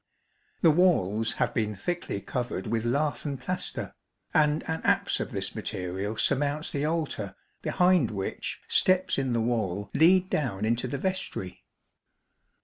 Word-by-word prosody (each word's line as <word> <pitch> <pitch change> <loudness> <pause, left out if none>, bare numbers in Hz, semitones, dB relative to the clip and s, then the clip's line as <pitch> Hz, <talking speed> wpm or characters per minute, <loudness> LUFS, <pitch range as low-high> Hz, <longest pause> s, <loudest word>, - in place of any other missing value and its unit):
The 165 - +8
walls 115 - +3
have - - 0
been 105 -2 -1
thickly 165 - -3
covered 125 +3 -3
with 115 0 -1
lath 145 +5 0
and 140 -3 -3
plaster, 180 +8 -3 0.4
and 150 0 +3
an 160 - -3
apse - - +2
of - - -3
this - - -2
material 95 +4 -4
surmounts 145 +4 0
the 145 0 -1
altar 150 - -2 0.3
behind 180 -8 +3
which, 100 -3 -4
steps 185 -5 +3
in 130 -2 0
the 115 - +1
wall 105 -4 -1
lead 185 +3 +5
down 115 - -1
into 115 +3 0
the 140 - -3
vestry. 185 - -3
135 Hz, 140 wpm, -28 LUFS, 110-160 Hz, 0.4 s, The